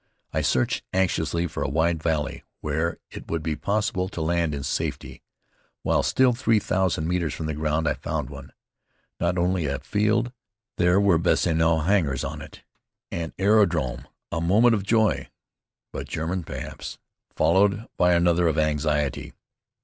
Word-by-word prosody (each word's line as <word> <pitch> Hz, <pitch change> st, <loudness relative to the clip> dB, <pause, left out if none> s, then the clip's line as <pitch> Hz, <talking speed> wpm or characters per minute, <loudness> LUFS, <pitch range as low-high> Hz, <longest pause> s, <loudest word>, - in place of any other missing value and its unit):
I -, -, +1 dB
searched 65 Hz, -1 st, +1 dB
anxiously 85 Hz, -3 st, +1 dB
for 80 Hz, -, -5 dB
a -, -, 0 dB
wide 80 Hz, +2 st, +1 dB
valley 80 Hz, -3 st, -1 dB, 0.2 s
where 80 Hz, +3 st, -1 dB
it -, -, -10 dB
would 80 Hz, -1 st, -2 dB
be 80 Hz, -1 st, -1 dB
possible 100 Hz, +2 st, -1 dB
to 90 Hz, -, -7 dB
land 85 Hz, -1 st, 0 dB
in 70 Hz, -, -5 dB
safety. 65 Hz, -, -3 dB, 0.6 s
While -, -, +2 dB
still 130 Hz, -1 st, +3 dB
three 115 Hz, -2 st, +2 dB
thousand 95 Hz, -5 st, 0 dB
metres 85 Hz, -4 st, -1 dB
from 80 Hz, -, -5 dB
the 80 Hz, -, -2 dB
ground 75 Hz, +1 st, 0 dB
I 75 Hz, -, +2 dB
found 75 Hz, -4 st, -4 dB
one. 70 Hz, -1 st, -10 dB, 0.7 s
Not 85 Hz, +1 st, 0 dB
only 90 Hz, -2 st, +1 dB
a 70 Hz, 0 st, -1 dB
field. 110 Hz, -, 0 dB, 0.4 s
There 90 Hz, +1 st, +4 dB
were 100 Hz, -5 st, +4 dB
bessonneau 80 Hz, -1 st, +2 dB
hangars 80 Hz, -6 st, +1 dB
on -, -, -5 dB
it. -, -, -12 dB, 0.5 s
An 85 Hz, -1 st, -4 dB
aerodrome! 85 Hz, -, +2 dB, 0.2 s
A 80 Hz, -, -2 dB
moment 110 Hz, +8 st, +4 dB
of 105 Hz, -, +1 dB
joy, 110 Hz, +2 st, +1 dB, 0.6 s
"but -, -, -6 dB
German, 85 Hz, +4 st, -2 dB
perhaps!" -, -, -7 dB, 0.4 s
followed 100 Hz, +5 st, +3 dB
by 90 Hz, 0 st, +4 dB
another 85 Hz, 0 st, +3 dB
of 80 Hz, -1 st, 0 dB
anxiety. 75 Hz, -2 st, 0 dB
85 Hz, 155 wpm, -25 LUFS, 80-95 Hz, 0.7 s, There